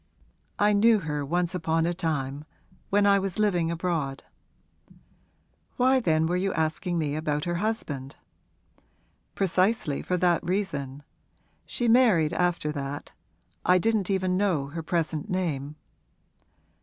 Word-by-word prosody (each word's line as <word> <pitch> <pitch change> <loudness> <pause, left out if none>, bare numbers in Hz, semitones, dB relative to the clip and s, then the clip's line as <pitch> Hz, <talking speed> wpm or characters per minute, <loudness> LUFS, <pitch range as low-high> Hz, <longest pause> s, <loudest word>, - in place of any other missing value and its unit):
'I 210 +1 +3
knew 220 +2 +5
her 150 -3 -3
once 175 +4 -1
upon 165 -2 0
a 175 - 0
time 150 -5 -3 0.5
when 205 0 +3
I 200 0 +5
was 190 -2 -3
living 180 -6 +1
abroad.' 165 -5 -2 1.5
'Why 260 +1 +4
then 160 -8 +2
were 175 +2 0
you 190 +2 0
asking 165 +3 -1
me 150 -3 -1
about 150 -1 -2
her 175 - -1
husband?' 145 - -3 1.2
'Precisely 185 -5 +1
for 180 - -1
that 175 -2 +2
reason. 150 -7 -3 0.6
She 240 - -2
married 220 -10 +4
after 175 -4 0
that 145 -1 -5 0.5
I 180 - +5
didn't 210 0 +1
even 185 -1 +1
know 175 -9 0
her 165 +3 -5
present 160 +3 -2
name.' 155 -6 -2
175 Hz, 130 wpm, -26 LUFS, 150-195 Hz, 1.5 s, knew